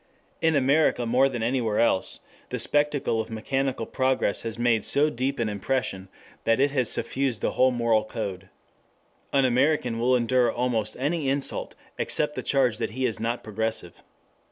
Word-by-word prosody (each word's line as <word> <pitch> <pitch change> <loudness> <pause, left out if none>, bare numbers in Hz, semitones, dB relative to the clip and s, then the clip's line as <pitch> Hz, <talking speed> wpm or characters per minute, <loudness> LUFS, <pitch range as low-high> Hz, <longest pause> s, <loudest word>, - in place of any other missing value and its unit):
In 160 -1 +3
America 140 -2 +2
more 125 +4 +3
than 120 -4 -4
anywhere 115 -3 0
else, 95 -5 +1 0.3
the - - -3
spectacle 145 -6 +1
of 110 - -8
mechanical 130 +2 -2
progress 130 -5 0
has 115 -1 -5
made 120 -3 +2
so 150 +2 +3
deep 130 +2 -2
an 115 - 0
impression, 105 -2 -2 0.3
that 115 +1 +2
it 140 +1 +3
has 130 -5 +1
suffused 130 0 -1
the - - +1
whole 130 - +3
moral 115 -3 +1
code. 100 -4 -6 0.8
An 135 -1 +3
American 125 -2 +1
will 125 +2 +3
endure 125 0 +2
almost 115 -3 -1
any 145 +1 0
insult 140 0 -2 0.2
except 150 -1 +1
the - - -4
charge 125 -5 +1
that - - -1
he 130 - 0
is 115 -3 -1
not 115 +2 -2
progressive. 110 -4 -3
125 Hz, 165 wpm, -25 LUFS, 115-135 Hz, 0.8 s, In